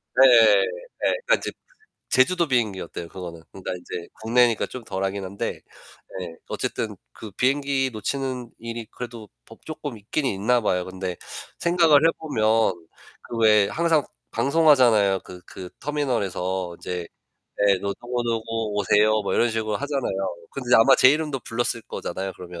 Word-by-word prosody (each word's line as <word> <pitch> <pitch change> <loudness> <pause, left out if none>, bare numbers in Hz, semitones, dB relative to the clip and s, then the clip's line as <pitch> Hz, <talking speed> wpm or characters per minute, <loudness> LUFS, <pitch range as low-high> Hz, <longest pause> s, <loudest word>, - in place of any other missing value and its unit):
네. 135 +1 +8 0.7
네. - - +2
그니까 - - +3
지 - - -3 0.6
제주도 170 +6 +3
비행기였대요 100 - -2
그거는. 85 -3 -8
그러니까 95 -1 -5
이제 90 -1 -7
국내니까 115 0 +3
좀 130 - -9
덜하긴 95 -1 -3
한데 95 +1 -4 0.6
예 90 - -4 0.2
어쨌든 - - -3 0.2
그 110 - -10
비행기 135 +3 +1
놓치는 130 +2 -3
일이 115 -1 -6
그래도 115 -3 -8 0.2
뭐 - - -14
쪼끔 145 -5 -6
있긴 110 +8 -3
있나 120 +2 +1
봐요. 90 -4 0
근데 95 -1 -5 0.4
생각을 165 -3 +5
해 - - +4
보면 145 -9 -1 0.8
그 120 - -4
왜 105 -2 +5
항상 165 -2 +2 0.3
방송하잖아요. 120 -8 +4
그 90 -1 -12
그 90 -1 -9
터미널에서 95 -11 -2
이제 90 -2 -5 0.6
예 100 -1 +4
뭐 100 0 -2
"누구누구 120 -2 -2 0.3
오세요." 105 +1 +3
뭐 - - -2
이런 120 - +3
식으로 110 -2 -1
하잖아요. 120 -11 -2
근데 125 -2 0
아마 125 +4 +7
제 130 - +7
이름도 150 -2 -1
불렀을 115 0 -2
거잖아요 95 -2 -5
그러면. 90 -1 -9
115 Hz, 325 characters per minute, -24 LUFS, 95-135 Hz, 0.8 s, 네